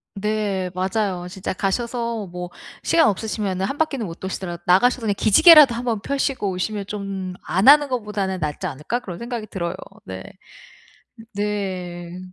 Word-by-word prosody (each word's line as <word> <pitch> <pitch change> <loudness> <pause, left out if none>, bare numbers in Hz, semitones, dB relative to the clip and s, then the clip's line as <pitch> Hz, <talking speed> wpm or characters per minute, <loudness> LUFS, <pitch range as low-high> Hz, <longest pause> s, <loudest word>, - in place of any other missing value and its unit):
네. 205 -2 -1
맞아요. 185 -1 -1
진짜 185 +1 -5
가셔서 230 +2 -2
뭐 180 0 -6 0.3
시간 330 -1 +4
없으시면은 200 -2 -1
1 275 - -4
바퀴는 280 -7 0
못 165 -2 -8
도시더라도 185 -2 -5
나가셔서 245 +8 +4
그냥 215 -3 0
기지개라도 290 - +8
1 240 - -4
번 230 -4 -1
펴시고 275 -5 -1
오시면 200 +2 -3
좀 195 -3 -5
안 190 +7 +1
하는 290 +1 +8
것보다는 210 -6 -2
낫지 155 +4 -3
않을까 150 - -3
그런 185 -8 -8
생각이 235 -2 -5
들어요. 170 -3 -4 0.3
네. 95 0 -7 1.1
네. 185 -4 -4
200 Hz, 325 characters per minute, -22 LUFS, 185-235 Hz, 1.1 s, 기지개라도